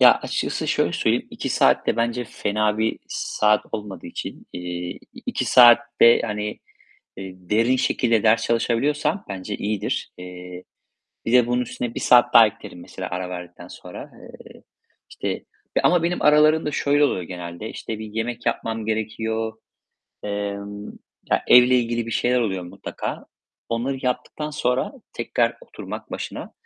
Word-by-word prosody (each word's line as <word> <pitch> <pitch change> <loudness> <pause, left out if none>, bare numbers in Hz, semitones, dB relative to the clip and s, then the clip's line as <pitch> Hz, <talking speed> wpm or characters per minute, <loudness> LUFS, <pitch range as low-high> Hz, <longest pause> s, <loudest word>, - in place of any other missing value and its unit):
Ya, - - +9
açıkçası - - -3
şöyle - - +1
söyleyeyim, - - +1
2 - - -4
saatte - - +3
bence 120 +1 0
fena 105 -1 -1
bir 110 0 0
saat 105 0 +1
olmadığı 105 -4 -6
için, 85 - -7
eee, 90 0 -5 0.3
2 - - -1
saatte, 120 -1 +6
hani, 105 -1 -4 0.6
eee, 95 -1 -7
derin 110 +7 +1
şekilde 115 -3 +1
ders 115 +1 +4
çalışabiliyorsam 145 - 0
bence 100 +1 -5
iyidir. 105 0 -2
Eee, 90 0 -9 0.6
bir 115 - 0
de 125 -1 +6
bunun 125 +1 +1
üstüne 120 -1 -5
1 - - -3
saat 120 0 +5
daha 115 -1 +10
eklerim 100 -3 -8
mesela 90 +1 -7
ara 90 0 -3
verdikten 90 -1 -8
sonra. 90 -1 -10
Eee, - - -14 0.5
işte - - -4 0.4
ama 175 -2 +4
benim 175 +1 -1
aralarında 150 +1 +5
şöyle 145 +1 +3
oluyor 95 -10 0
genelde, 85 +3 -7
işte, 110 - -6
bir 110 - -6
yemek 115 +2 -4
yapmam 115 -2 -2
gerekiyor, 110 0 -2 0.7
emm 100 0 -4 0.4
ya, - - +2
evle 125 +1 +7
ilgili 120 -1 -1
bir - - -5
şeyler 125 +2 +2
oluyor 95 -6 -1
mutlaka. 90 - -6 0.4
Onları 125 +4 -2
yaptıktan 140 +4 -3
sonra 125 - 0 0.2
tekrar - - 0
oturmak - - -9
başına, - - -6
110 Hz, 140 wpm, -23 LUFS, 100-125 Hz, 0.7 s, daha